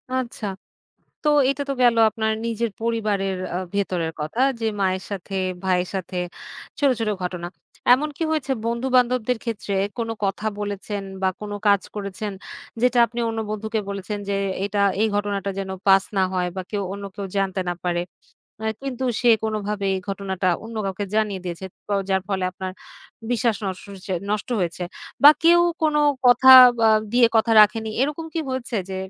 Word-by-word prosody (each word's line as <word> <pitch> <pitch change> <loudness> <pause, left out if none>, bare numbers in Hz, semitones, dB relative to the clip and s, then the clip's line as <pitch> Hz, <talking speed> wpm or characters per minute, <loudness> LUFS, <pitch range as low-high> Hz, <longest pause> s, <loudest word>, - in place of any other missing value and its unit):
আচ্ছা। 245 -3 -3 0.8
তো - - 0 0.2
এটা 275 +1 -1
তো - - +1
গেল 240 -1 +5
আপনার 220 0 -1
নিজের 230 0 -1
পরিবারের 210 -4 -1 0.2
আ - - 0 0.2
ভেতরের 180 -5 -1
কথা 155 +10 -4 0.2
যে, 225 - -2 0.2
মায়ের 190 -1 0
সাথে, 195 0 -5 0.3
ভাইয়ের 180 -1 +1
সাথে 185 -1 -4 0.6
ছোট, 285 - +3
ছোট 225 -2 0
ঘটনা। 180 -1 -4 0.5
এমন 295 +4 +1
কি - - -1
হয়েছে 280 -4 -1
বন্ধু-বান্ধবদের 250 0 +1
ক্ষেত্রে 225 -4 -4 0.2
কোন 230 -1 -2
কথা 195 +2 -1
বলেছেন 205 0 -4 0.2
বা, 190 - +2
কোন 210 -1 -6 0.2
কাজ 200 -1 +5
করেছেন, 205 +1 -4 0.5
যেটা 250 0 +3
আপনি 235 +1 -7
অন্য 225 0 -3
বন্ধুকে 220 +1 -2
বলেছেন 200 +1 -4
যে, 200 - 0 0.3
এটা 205 0 -2 0.2
এই 220 - +4
ঘটনাটা 205 -1 -1
যেন 190 -1 -4 0.2
পাস 195 0 +6
না 190 - +4
হয় 180 -1 0
বা, 190 - -2
কেউ 205 -2 -1
অন্য 200 0 -7
কেউ 200 - -4
জানতে 195 -1 0
না - - 0
পারে। 175 -1 0 0.6
আ - - -2 0.2
কিন্তু 265 -2 -4 0.2
সে 245 - +4
কোনোভাবে 210 -2 -2
এই - - -2
ঘটনাটা 195 -1 -2 0.2
অন্য 230 0 -9
কাউকে 195 +1 -3
জানিয়ে 210 -3 0
দিয়েছে। 175 +1 -5 0.2
তো 205 - -1 0.2
যার 190 0 +2
ফলে 190 -2 -1
আপনার 185 0 -6 0.6
বিশ্বাস 235 -2 +1
নষ্ট 190 -1 -4
হচে 190 0 -8 0.2
নষ্ট 210 +2 -2
হয়েছে 180 0 -2 0.4
বা, 290 - +12
কেউ 345 +1 +6 0.2
কোন 310 -1 +2 0.3
কথা 245 +1 +5 0.4
আ - - +6 0.2
দিয়ে 245 -1 +6
কথা 225 +1 +3
রাখেনি? 220 +1 +2
এরকম 300 +4 -1
কি 330 - -1
হয়েছে 260 -2 -3
যে 190 - -4
205 Hz, 170 wpm, -23 LUFS, 190-235 Hz, 0.8 s, বা